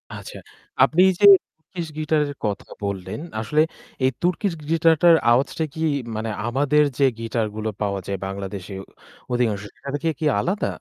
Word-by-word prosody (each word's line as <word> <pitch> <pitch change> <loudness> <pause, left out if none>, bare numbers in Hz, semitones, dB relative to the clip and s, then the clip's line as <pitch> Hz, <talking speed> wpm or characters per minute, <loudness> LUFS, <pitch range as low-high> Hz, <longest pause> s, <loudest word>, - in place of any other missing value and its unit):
আচ্ছা, - - -9 0.5
আপনি 170 +3 +4 0.2
যে 205 - +5 0.3
turkish 165 0 -7
guitar 155 0 +1
এর 145 - -6
কথা 100 -1 -3 0.2
বললেন, 100 +2 -4 0.2
আসলে 150 +8 +1 0.4
এই 130 - +4
turkish 180 +2 0
guitar 165 +1 +3
টার 170 -2 +7 0.2
আওয়াজটা 135 +6 +1
কি - - -9 0.4
মানে 110 +1 -3 0.2
আমাদের 145 +4 +3
যে 140 - +2 0.2
গিটার 115 -1 -1
গুলো 110 0 -2
পাওয়া 100 -1 -1
যায় 100 -1 -2
বাংলাদেশে 95 0 -6 0.6
অধিকাংশ, 110 -5 0
সেটা 140 - -9
থেকে 160 +3 -1
কি 160 - -2
আলাদা? 190 - -1
135 Hz, 155 wpm, -23 LUFS, 105-160 Hz, 0.6 s, টার